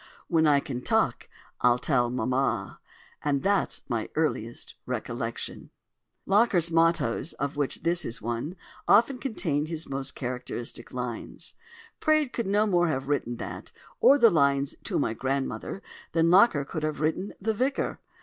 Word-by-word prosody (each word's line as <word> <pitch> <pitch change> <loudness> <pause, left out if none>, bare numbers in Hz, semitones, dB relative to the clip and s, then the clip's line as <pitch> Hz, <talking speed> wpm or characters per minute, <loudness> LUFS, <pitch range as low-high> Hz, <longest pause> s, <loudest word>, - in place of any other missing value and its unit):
When 160 -2 +3
I 145 -1 +5
can 130 -3 -5
talk - - +1 0.3
I'll 120 0 +4
tell 125 -2 +1
Mamma.' 125 +2 -1 0.4
—And 140 -2 0
that's 200 +1 +1
my - - -2
earliest - - -2
recollection." - - -4 0.6
(Locker's 195 -5 +3
"mottoes," 165 -4 +2
of 140 +1 -3
which 145 -2 -2
this 170 +1 +2
is 115 - -4
one, 120 - -3 0.3
often 235 +5 +5
contain 160 - -1
his 165 0 -4
most 135 0 -3
characteristic 125 -2 -5
lines.) 125 -2 -4 0.5
Praed 310 -4 +2
could 235 -4 -2
no 205 +2 +3
more 175 -4 +3
have 135 -2 -2
written 125 -4 0
that, - - -7 0.3
or 280 - +7
the 235 -5 +6
lines 140 -3 +2
"To - - -1
my 115 - 0
Grandmother," 135 - -3 0.3
than 165 0 +3
Locker 180 -7 +5
could 155 - -4
have 155 0 -2
written 160 +6 -1
"The 220 +3 0
Vicar." 260 +6 -1
155 Hz, 150 wpm, -27 LUFS, 135-195 Hz, 0.6 s, or